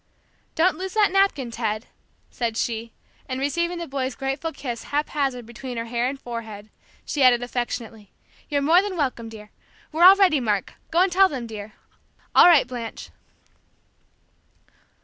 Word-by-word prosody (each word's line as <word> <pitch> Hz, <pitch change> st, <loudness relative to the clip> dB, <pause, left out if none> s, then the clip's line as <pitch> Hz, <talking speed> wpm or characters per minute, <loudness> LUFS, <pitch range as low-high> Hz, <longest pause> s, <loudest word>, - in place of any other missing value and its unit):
"Don't 360 Hz, +4 st, +2 dB
lose 380 Hz, +1 st, -5 dB
that 420 Hz, -3 st, +4 dB
napkin, 385 Hz, -11 st, +1 dB
Ted," 220 Hz, -1 st, -3 dB, 0.5 s
said 230 Hz, -2 st, -3 dB
she, 230 Hz, 0 st, -2 dB, 0.4 s
and 255 Hz, 0 st, -3 dB
receiving 340 Hz, +6 st, -1 dB
the 340 Hz, -, -4 dB
boy's 265 Hz, -3 st, -3 dB
grateful 270 Hz, +4 st, -3 dB
kiss 240 Hz, -7 st, -6 dB
haphazard 280 Hz, -4 st, -2 dB
between 240 Hz, +1 st, -8 dB
her 230 Hz, -, -3 dB
hair 235 Hz, +1 st, -1 dB
and 275 Hz, 0 st, -6 dB
forehead, 220 Hz, -4 st, -8 dB, 0.3 s
she 290 Hz, -, -2 dB
added 245 Hz, -2 st, +5 dB
affectionately: 240 Hz, -4 st, -5 dB, 0.4 s
"You're 285 Hz, -2 st, 0 dB
more 335 Hz, +5 st, +5 dB
than 395 Hz, -2 st, -4 dB
welcome, 255 Hz, -6 st, -2 dB
dear! 210 Hz, -1 st, -12 dB, 0.4 s
We're 320 Hz, +2 st, +1 dB
all 380 Hz, +1 st, +10 dB
ready, 370 Hz, -7 st, +4 dB
Mark, 210 Hz, -6 st, -1 dB, 0.2 s
go 340 Hz, -, +2 dB
and 375 Hz, 0 st, +3 dB
tell 380 Hz, +2 st, +5 dB
them, 255 Hz, -5 st, -5 dB
dear! 215 Hz, -2 st, -8 dB, 0.6 s
All -, -, +8 dB
right, 330 Hz, -7 st, +6 dB
Blanche." 240 Hz, -2 st, -7 dB
255 Hz, 155 wpm, -23 LUFS, 230-325 Hz, 0.6 s, all